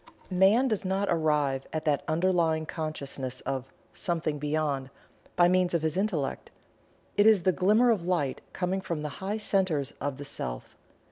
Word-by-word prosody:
Man 195 +8 +4
does 215 -4 0
not 195 +1 0
arrive 150 -5 +1
at 155 0 -3
that 150 -2 +1
underlying 165 -1 +1
consciousness 140 -5 -4
of 135 -1 -4 0.2
"Something 165 -5 -2
Beyond" 145 -2 -1 0.5
by 175 - +5
means 180 -1 +2
of 165 - 0
his 160 0 0
Intellect 185 -8 -1 0.7
it 205 +1 +6
is 210 -5 +5
the 185 - +4
glimmer 210 +7 +4
of 185 -6 -1
light 150 -8 0
coming 185 +1 -1
from 170 -5 -4
the 150 - -2
higher 200 +3 -2
centers 185 -10 +1
of 140 -1 -2
the 145 - -7
Self. - - -5
165 Hz, 160 wpm, -28 LUFS, 145-190 Hz, 0.7 s, it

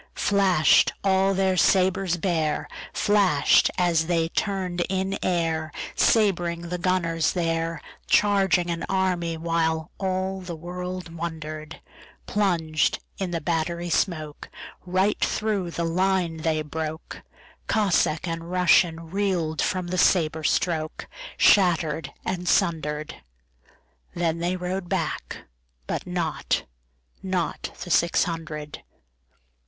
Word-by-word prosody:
Flash'd 190 -6 +4
all 195 0 +3
their 190 0 +2
sabres 185 0 +2
bare, 160 -4 -1 0.2
Flash'd 205 -3 +3
as 170 -3 +2
they 165 -2 +1
turn'd 185 -2 -2
in 190 0 -1
airSabring 170 +1 0
the 180 - -2
gunners 170 -3 +1
there, 165 -2 -1 0.3
Charging 190 -4 +3
an 170 - -3
army, 180 -3 0
whileAll 170 +4 -1
the 175 -2 -6
world 180 +1 -6
wonder'd:Plunged 160 +1 -3 0.2
in 190 -2 -2
the 170 -1 -3
battery 170 +2 -2
smokeRight 180 +4 -2
thro' 210 -5 0
the 170 0 -3
line 180 -1 +1
they 155 -1 -1
broke; 155 +1 -6 0.5
Cossack 180 -6 +1
and 165 0 -3
RussianReel'd 170 0 +1
from 185 -3 -1
the 185 0 -1
sabre 160 -3 +3
strokeShatter'd 165 - +1
and 180 -2 -2
sunder'd. 155 -2 0 1.0
Then 170 -1 0
they 175 +2 0
rode 180 0 -4
back, - - -3 0.4
but - - -3
notNot 175 -3 -1 1.2
the 175 - -7
six 170 +2 +3
hundred. 155 -3 -6
175 Hz, 95 wpm, -25 LUFS, 160-185 Hz, 1.2 s, Flash'd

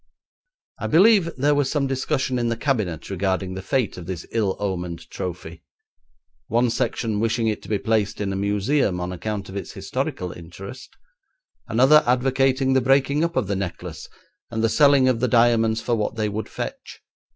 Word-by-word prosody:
I - - -2
believe 190 +1 +5
there 145 +3 +3
was 145 -2 +1
some 145 -2 0
discussion 130 -1 -1
in 120 -1 0
the 115 - -2
Cabinet 105 - -2
regarding 95 0 -1
the 95 - -5
fate 110 +3 -1
of 85 - -10
this 90 -3 -5
ill 105 -4 0
omened 90 -4 -4
trophy, 85 -2 -6 0.9
one 120 +2 +2
section 115 -3 -1
wishing 115 +1 0
it 110 - -1
to - - -12
be 105 - +1
placed 105 -1 0
in 100 -2 -2
a - - -2
museum 100 +1 +1
on 90 +1 -3
account 100 +2 -4
of 95 - -9
its 100 - -5
historical 90 -1 -3
interest, 95 +9 -10 0.7
another 135 +7 +5
advocating 130 +1 +2
the 130 - +3
breaking 135 +3 +2
up 170 0 -1
of 130 - +1
the 100 +1 -2
necklace 95 -2 -6 0.4
and 110 -1 -2
the 115 - +3
selling 140 -1 +5
of 125 -3 +2
the 125 - +1
diamonds 115 -1 +3
for 120 - -1
what 110 -1 -1
they 110 -1 -1
would 105 +2 -4
fetch. - - -7
115 Hz, 180 wpm, -23 LUFS, 95-130 Hz, 0.9 s, believe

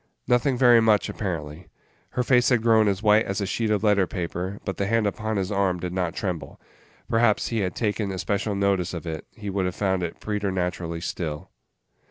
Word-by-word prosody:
Nothing 125 +2 +2
very 120 -2 +6
much, 110 -2 +3
apparently. 80 -4 -5 0.5
Her 125 - +3
face 125 -1 +4
had 120 -3 +2
grown 110 -2 +5
as 100 +1 0
white 110 +1 +4
as 100 +1 -2
a 100 - -1
sheet 110 +3 -1
of 105 -1 +1
letter 100 -3 +3
paper, 90 +2 -4
but 95 - -3
the 100 - -1
hand 115 0 +2
upon 110 +1 -2
his 95 +1 -1
arm 95 -3 +1
did 90 0 -4
not 90 -2 -1
tremble. 90 -5 -4 0.5
Perhaps, 115 -2 +2
had 115 - -1
he 90 - 0
taken 105 0 -2
especial 100 +2 -2
notice 100 -3 0
of 85 - -6
it, 80 -2 -5
he 105 -2 -7
would 95 -1 0
have 90 - -4
found 95 -2 0
it 85 -1 -4
preternaturally 90 -5 -2
still. 80 +1 -4
100 Hz, 200 wpm, -25 LUFS, 90-110 Hz, 0.5 s, very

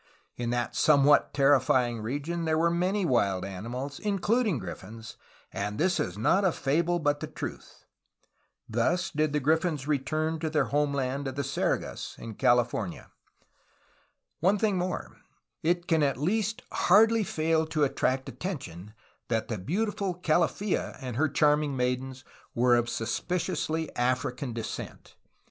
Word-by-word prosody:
In 120 -1 -3
that 120 0 -1
somewhat 145 -1 +5
terrifying 130 -4 +3
region 145 +9 -3
there 160 0 +1
were 170 +1 +3
many 185 +3 0
wild 100 - +1
ani 100 +3 -6
mals, 135 +4 -5
including 210 - +1
griffins, 110 +3 -8 0.4
*^and 105 +1 -3
this 180 +2 +1
is 90 +1 -2
not 185 - +3
a 185 - +4
fable 165 +5 +1
but 145 -3 0
the 155 - -5
truth." 150 - -8 0.8
Thus 160 +11 0
did 155 0 0
the 150 - +1
griffins 155 0 0
return 155 +3 -1
to 160 0 -2
their 150 -3 +1
homeland 140 -1 -1
of 130 - -4
the 140 - -1
SergaSy 135 +1 -2
in 115 - -8
California. 120 -5 0 1.3
One 190 +5 +3
thing 210 -1 +1
more: 180 +1 -4 0.4
It 175 +2 +1
can 160 -2 +3
at 140 -4 +1
least 210 - -1
hardly 220 +4 +4
fail 160 -2 0
to 155 -2 0
attract 135 -1 0
attention 105 - -6 0.3
that 115 -2 -1
the 110 -4 -3
beautiful 195 - -1
Calaffa 175 +4 0
and 130 -4 -5
her 155 +5 +2
charming 145 -1 +2
maidens 125 +1 -2 0.3
were 120 +1 +4
of 120 0 +1
suspiciously 160 +5 -2
African 125 +1 -1
descent. 115 -1 -6
145 Hz, 140 wpm, -28 LUFS, 125-170 Hz, 1.3 s, somewhat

